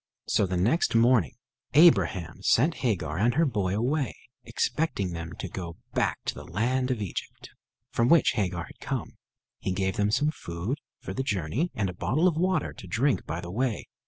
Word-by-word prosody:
So 100 Hz, -, +2 dB
the 90 Hz, 0 st, -1 dB
next 115 Hz, -, +2 dB
morning 115 Hz, -, +4 dB, 0.4 s
Abraham 100 Hz, -, +4 dB
sent 155 Hz, +8 st, +3 dB
Hagar 90 Hz, -, -1 dB
and 120 Hz, +3 st, +2 dB
her 165 Hz, -, +4 dB
boy 100 Hz, -8 st, 0 dB
away, 130 Hz, +5 st, 0 dB, 0.3 s
expecting 100 Hz, -, -1 dB
them 85 Hz, +1 st, -6 dB
to -, -, -4 dB
go 85 Hz, -2 st, -6 dB, 0.2 s
back -, -, +1 dB
to -, -, -1 dB
the -, -, -9 dB
land 125 Hz, +8 st, 0 dB
of 120 Hz, -5 st, -1 dB
Egypt, 95 Hz, -, -7 dB, 0.4 s
from 115 Hz, +1 st, +2 dB
which 170 Hz, -3 st, +6 dB
Hagar 95 Hz, -4 st, -1 dB
had -, -, -14 dB
come. -, -, -4 dB, 0.4 s
He -, -, -2 dB
gave 95 Hz, 0 st, -1 dB
them 105 Hz, 0 st, +2 dB
some 145 Hz, +8 st, +2 dB
food 95 Hz, -, -4 dB, 0.2 s
for -, -, -5 dB
the 130 Hz, -, -2 dB
journey, 105 Hz, -, -1 dB
and 100 Hz, -3 st, 0 dB
a 90 Hz, -, -4 dB
bottle 130 Hz, -, +1 dB
of 175 Hz, -, +2 dB
water 180 Hz, -1 st, 0 dB
to -, -, -11 dB
drink 130 Hz, +2 st, +1 dB
by 80 Hz, +3 st, -3 dB
the 85 Hz, 0 st, -7 dB
way. 120 Hz, +2 st, -1 dB
110 Hz, 190 wpm, -27 LUFS, 90-135 Hz, 0.4 s, which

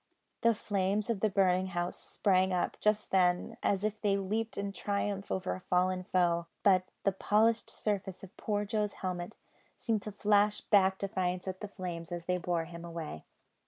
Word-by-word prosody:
The 230 Hz, -1 st, +4 dB
flames 205 Hz, +2 st, 0 dB
of 220 Hz, -, -2 dB
the 215 Hz, -, +2 dB
burning 190 Hz, -1 st, +3 dB
house 175 Hz, -1 st, -3 dB
sprang 190 Hz, -2 st, +2 dB
up, 180 Hz, -1 st, 0 dB
just 210 Hz, 0 st, +1 dB
then, 180 Hz, -2 st, +2 dB
as 200 Hz, 0 st, +1 dB
if 215 Hz, 0 st, -2 dB
they 200 Hz, -2 st, +2 dB
leaped 215 Hz, +3 st, -2 dB
in 200 Hz, 0 st, -2 dB
triumph 200 Hz, 0 st, -2 dB
over 190 Hz, 0 st, -1 dB
a -, -, -6 dB
fallen 185 Hz, 0 st, +1 dB
foe; 170 Hz, -2 st, +2 dB, 0.2 s
but 185 Hz, -2 st, +5 dB, 0.2 s
the 195 Hz, -, +3 dB
polished 220 Hz, +4 st, +2 dB
surface 200 Hz, -3 st, -3 dB
of 195 Hz, +1 st, -11 dB
poor 205 Hz, -1 st, -1 dB
Joe's 210 Hz, -1 st, -1 dB
helmet 180 Hz, +1 st, -4 dB, 0.4 s
seemed 225 Hz, -3 st, 0 dB
to 210 Hz, -, -6 dB
flash 205 Hz, +1 st, +3 dB
back 190 Hz, -2 st, +3 dB
defiance 185 Hz, -2 st, -2 dB
at 185 Hz, 0 st, -4 dB
the 210 Hz, -, -5 dB
flames 175 Hz, -4 st, -6 dB
as 175 Hz, -1 st, -4 dB
they 180 Hz, 0 st, 0 dB
bore 170 Hz, -1 st, -1 dB
him 170 Hz, 0 st, -9 dB
away. 165 Hz, -, -6 dB
190 Hz, 180 wpm, -32 LUFS, 180-205 Hz, 0.4 s, but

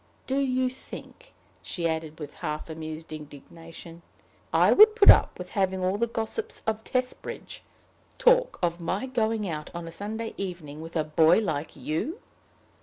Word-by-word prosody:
Do 270 Hz, +1 st, 0 dB
you 255 Hz, -1 st, +1 dB
think," 265 Hz, -, -10 dB, 0.3 s
she 170 Hz, -2 st, -2 dB
added 160 Hz, -1 st, -3 dB
with 145 Hz, -2 st, -7 dB
half 150 Hz, +2 st, -5 dB
amused 160 Hz, 0 st, -7 dB
indignation, 165 Hz, +3 st, -11 dB, 0.5 s
"I -, -, +5 dB
would 430 Hz, +1 st, +8 dB
put 420 Hz, -3 st, +10 dB
up -, -, +3 dB
with -, -, -8 dB
having 190 Hz, -2 st, 0 dB
all 190 Hz, +2 st, 0 dB
the 235 Hz, -, +2 dB
gossips 230 Hz, -, -4 dB
of 220 Hz, 0 st, -1 dB
Testbridge 255 Hz, +1 st, -4 dB, 0.6 s
talk -, -, +4 dB
of 170 Hz, 0 st, 0 dB
my 185 Hz, +8 st, -2 dB
going 225 Hz, -4 st, 0 dB
out 150 Hz, -3 st, -4 dB
on 170 Hz, -1 st, -5 dB
a -, -, -7 dB
Sunday 220 Hz, +5 st, -5 dB
evening 170 Hz, -6 st, -6 dB
with 165 Hz, +1 st, -9 dB
a 160 Hz, -, +2 dB
boy 160 Hz, +2 st, +4 dB
like 160 Hz, -8 st, -2 dB
you?" 290 Hz, -, -3 dB
185 Hz, 160 wpm, -27 LUFS, 160-235 Hz, 0.6 s, put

